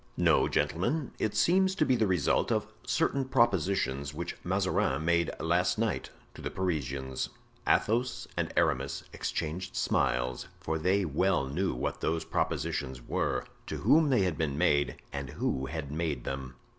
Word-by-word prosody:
"No, - - +4
gentlemen, 135 - 0
it 105 -1 0
seems 190 - +4
to 155 - +2
be 130 - +3
the 110 -3 +2
result 90 -6 +2
of - - +1 0.2
certain 140 - +1
propositions 95 - +1
which 85 +2 -4
Mazarin 75 - +1
made 85 -1 +3
last 90 +3 +2
night 110 -2 -1 0.2
to - - -11
the - - -3
Parisians." 70 -7 -2 0.4
Athos 120 +3 +1
and - - -1
Aramis 70 +2 +1
exchanged 90 +4 -3
smiles; 60 0 0
for 80 0 -2
they 95 +4 +2
well 80 0 +2
knew 90 +8 -1
what - - -3
those 80 0 0
propositions 65 -1 -1
were, - - -1 0.2
to - - -3
whom 155 -1 +5
they 125 -7 +4
had 90 -4 -1
been 75 -3 0
made 70 -1 +2 0.2
and 70 -2 -4
who 65 0 -1
had 70 -1 -5
made 75 -5 -2
them. 65 -1 -5
85 Hz, 155 wpm, -30 LUFS, 70-100 Hz, 0.4 s, whom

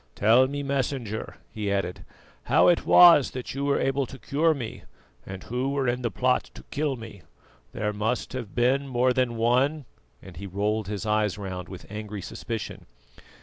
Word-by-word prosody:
"Tell 115 +5 +5
me, 145 +1 -4
Messenger," 130 -5 -3 0.2
he 105 -2 -3
added, 95 -2 -2 0.4
"how - - +4
it 175 - +2
was 170 -6 +8
that 130 -1 -6
you 140 +1 -3
were 140 - +2
able 135 0 0
to 135 - -10
cure 155 +4 +1
me, 120 -5 -6 0.5
and 95 -1 -7
who 125 +3 -2
were 140 -2 -1
in 125 +1 0
the 120 - -1
plot 125 +3 +1
to - - -11
kill 145 -2 -1
me? 115 -5 -10 0.5
There 105 0 -2
must 110 +6 -2
have 120 -6 -6
been 130 +3 +2
more 125 0 +2
than 125 -2 0
one," 130 +6 +2 0.3
and 90 -4 -13
he 100 +3 -6
rolled 105 +2 -1
his 105 +1 -4
eyes 105 -2 +1
round 95 -3 -6
with 95 - -9
angry 105 -1 -6
suspicion. 115 +2 -6
120 Hz, 180 wpm, -26 LUFS, 105-135 Hz, 0.5 s, was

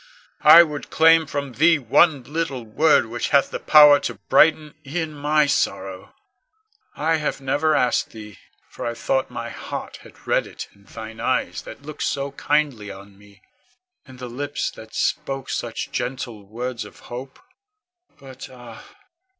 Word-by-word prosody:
I 170 - +10
would 150 -3 -6
claim 160 0 +5
from 140 -2 -4
thee 160 +6 +4
one 140 +2 +3
little 145 -2 -4
word 150 +6 +3
which 115 +2 -4
hath 140 -2 +3
the - - -4
power 150 -2 +7
to - - -4
brighten 155 -1 +2
e'en 155 +2 -4
my 150 +1 +2
sorrow. 95 -8 -2 0.8
I 160 +2 +1
have 150 -2 -3
never 145 +3 +1
asked 125 -3 +1
thee, 105 -2 -12 0.3
for - - -10
I 120 - -3
thought 130 +3 -1
my 115 0 -6
heart - - -7
had - - -18
read - - +1
it - - -9
in 100 0 -24
thine 110 +1 -10
eyes - - -1
that - - -11
looked 155 +1 -9
so 140 0 -2
kindly 140 -7 -1
on 100 +1 -12
me; 100 -1 -21 0.6
in 130 -1 -13
the 125 0 -7
lips 145 +4 -4
that 110 0 -13
spoke 135 -1 -2
such - - -4
gentle 120 -5 -5
words 120 +2 -5
of 105 - -14
hope. 130 +2 -9 0.8
But 135 -1 -11
ah! 120 -3 -12
135 Hz, 160 wpm, -22 LUFS, 115-150 Hz, 0.8 s, I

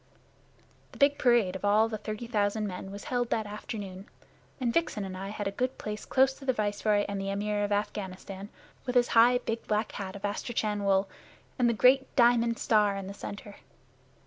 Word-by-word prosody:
The - - -12
big 285 0 +3
parade 235 -8 +3
of 190 - -6
all 210 +2 +4
the 220 -1 -5
thirty 215 +2 -5
thousand 215 -2 0
men 195 -1 -6
was 200 +1 -8
held 245 -2 -1
that 220 - 0
afternoon, 205 -2 -7 0.5
and 240 -3 0
Vixen 225 -11 0
and 185 -1 -6
I 190 +1 -5
had 205 -1 -4
a - - -1
good 255 +5 -2
place 210 0 -5
close 265 0 +3
to 275 - -10
the 260 - +2
Viceroy 205 -1 +1
and 200 -1 -3
the 195 - -3
Amir 205 +1 -1
of 205 - -2
Afghanistan, 200 -1 -4 0.4
with 245 -1 +3
high, 240 +2 +6
big 230 -2 -4
black 215 +1 0
hat 195 -1 -6
of 200 0 -5
astrakhan 210 0 -2
wool 195 0 +3 0.5
and 240 -1 +4
the - - +2
great 265 +4 +4
diamond 235 -1 +4
star 210 -2 +3
in 195 - -5
the 195 - -6
center. 205 0 -8
210 Hz, 195 wpm, -29 LUFS, 200-235 Hz, 0.5 s, high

